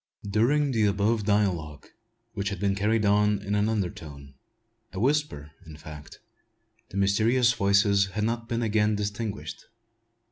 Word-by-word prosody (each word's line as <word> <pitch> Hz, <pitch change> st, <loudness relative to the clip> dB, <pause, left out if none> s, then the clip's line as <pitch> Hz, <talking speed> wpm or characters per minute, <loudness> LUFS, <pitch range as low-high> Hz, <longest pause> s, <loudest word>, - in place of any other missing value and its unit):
During 135 Hz, +8 st, +2 dB
the 110 Hz, -4 st, +2 dB
above 105 Hz, +2 st, 0 dB
dialogue, 90 Hz, -8 st, -1 dB, 0.5 s
which 100 Hz, -2 st, -2 dB
had 100 Hz, -3 st, -5 dB
been 100 Hz, 0 st, +1 dB
carried 105 Hz, +2 st, 0 dB
on 105 Hz, +1 st, +3 dB
in 100 Hz, 0 st, -4 dB
an 105 Hz, +1 st, +1 dB
undertone, 80 Hz, -9 st, -5 dB, 0.6 s
a 95 Hz, -, -5 dB
whisper, 130 Hz, -, -1 dB, 0.2 s
in 80 Hz, -2 st, -11 dB
fact, 75 Hz, -1 st, -11 dB, 0.7 s
the -, -, -7 dB
mysterious 115 Hz, +5 st, +3 dB
voices 100 Hz, -1 st, +3 dB
had 105 Hz, +2 st, -4 dB
not 115 Hz, +1 st, -2 dB
been 115 Hz, 0 st, -1 dB
again 105 Hz, -1 st, +1 dB
distinguished. 105 Hz, +1 st, -5 dB
105 Hz, 140 wpm, -26 LUFS, 100-110 Hz, 0.7 s, on